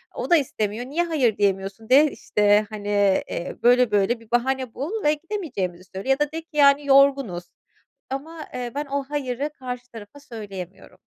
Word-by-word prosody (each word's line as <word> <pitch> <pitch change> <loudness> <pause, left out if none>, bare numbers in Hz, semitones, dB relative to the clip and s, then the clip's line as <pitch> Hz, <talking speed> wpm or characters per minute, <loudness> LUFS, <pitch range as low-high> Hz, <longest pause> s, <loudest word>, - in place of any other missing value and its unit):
O - - -4
da 345 - +6
istemiyor, 225 -4 -2
"Niye 315 +6 -1
hayır 275 -10 +1
diyemiyorsun 195 +2 -1
de, 285 +3 +6
işte, 210 0 +2
hani, 205 -1 -7 0.4
eee, 170 - -4
böyle 245 0 +5
böyle 205 +4 +2
bir 230 0 -20
bahane 255 0 0
bul 380 - -4
ve 295 +1 +4
gidemeyeceğimizi 295 - -4
söyle. 195 +8 -5
Ya 270 +2 +3
da 295 0 0
de 325 +1 -4
ki 320 -2 -13
yani 280 0 +5
yorgunuz." 275 -10 +4 0.7
Ama 310 +4 -6
ben, 245 +1 -5
eee, - - -18
o 280 0 -1
hayırı 280 0 -2
karşı 250 -1 -6
tarafa 225 +5 -11
söyleyemiyorum. 195 -8 -9
250 Hz, 175 wpm, -23 LUFS, 210-285 Hz, 0.7 s, da